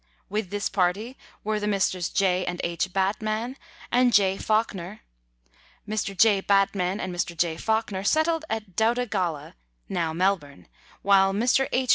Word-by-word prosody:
With 210 -2 -2
this 205 +1 -2
party 195 +6 -1 0.3
were 215 0 -1
the 210 - -2
Messrs. 190 -3 0
J. 185 -2 +1
and 175 0 -4
H. 170 +2 -2
Batman 215 +6 -1 0.4
and 245 0 +4
J. 195 -3 +4
Fawkner. 210 -2 -1 0.9
Mr. 205 -2 -3
J. 210 -1 +5
Batman 195 -1 +1
and 185 -3 -4
Mr. 175 -1 -3
J. 165 -1 +1
Fawkner 220 0 -1
settled 315 +7 +2
at 215 -5 -4
Doutta 235 +4 +2
Galla 175 -9 -3 0.3
(now 170 -4 -1
Melbourne), 165 - -1 0.4
while 195 -1 +4
Mr. 245 +5 +2
H. 255 0 0
195 Hz, 145 wpm, -25 LUFS, 180-220 Hz, 0.9 s, J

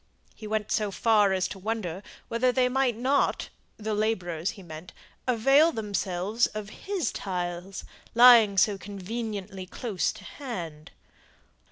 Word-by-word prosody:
He 215 - -9
went 215 -1 -2
so 210 -1 +1
far 210 0 +3
as 190 0 +1
to 195 - -8
wonder 195 -4 -3 0.3
whether 240 +2 +1
they 250 0 +2
might 250 -2 +1
not 265 +4 +1 0.3
the 215 0 -3
labourers 185 -6 -1
he 195 - -11
meant 160 +1 -10 0.3
avail 270 +7 +4
themselves 205 - -1
of 215 -1 -7
his 380 - -3
tiles, 180 0 -4 0.3
lying 235 -4 +8
so 195 +1 +3
conveniently 200 -1 -6
close 205 -1 -2
to - - -13
hand. 170 - -7
210 Hz, 135 wpm, -27 LUFS, 185-235 Hz, 0.3 s, lying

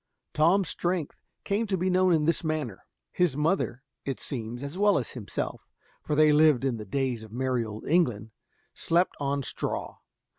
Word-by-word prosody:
Tom's 175 +5 +3
strength 175 -3 -2 0.2
came 210 +3 0
to 195 -2 0
be 185 +2 -1
known 185 0 +3
in 155 -3 +3
this 165 +2 +1
manner: 155 - -3 0.2
his 175 -7 +1
mother, 150 -5 0 0.2
it 135 -2 -3
seems, 120 0 -4
as 140 +3 -5
well 205 +1 +4
as 130 - -3
himself, 115 -6 -4 0.4
for 150 - -2
they 155 0 +5
lived 150 -4 +5
in 130 -4 0
the 105 - -7
days 130 +1 -1
of 110 -1 -11
merry 125 0 0
old 110 -1 -7
England, 120 - +1 0.4
slept 175 +2 +1
upon 140 -1 -1
straw. - - -3
150 Hz, 175 wpm, -27 LUFS, 125-175 Hz, 0.4 s, they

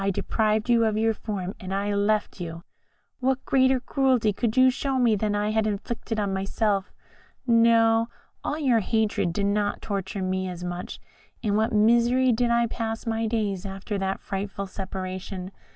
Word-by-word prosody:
I 200 - +1
deprived 215 +2 0
you 235 -1 +4
of 215 -1 +1
your 225 +1 +2
form, 200 -3 -4
and 185 0 -7
I 200 +1 -1
left 205 -1 0
you. 165 0 -6 0.6
What 265 0 0
greater 260 -1 +3
cruelty 255 -4 +1
could 225 +3 -1
you 255 0 +7
show 270 +1 -2
me 240 -4 +4
than 205 0 0
I 210 +1 0
had 220 0 +1
inflicted 220 +2 -3
on 200 -2 -1
myself? 195 +1 -1 0.5
No, 230 -1 +4 0.3
all 295 - -2
your 260 -7 +3
hatred 215 -4 0
did 200 +4 -1
not 205 0 0
torture 195 -1 -3
me 185 0 -1
as 180 -1 -7
much. 180 0 -5 0.4
In 205 -2 +1
what 220 +1 +2
misery 235 +4 +4
did 240 +1 +1
I 235 0 +3
pass 225 0 -4
my 225 0 -1
days 210 -4 -1
after 195 +1 -4
that 195 0 -2
frightful 195 0 -4
separation! 185 0 -6
215 Hz, 170 wpm, -25 LUFS, 195-230 Hz, 0.6 s, you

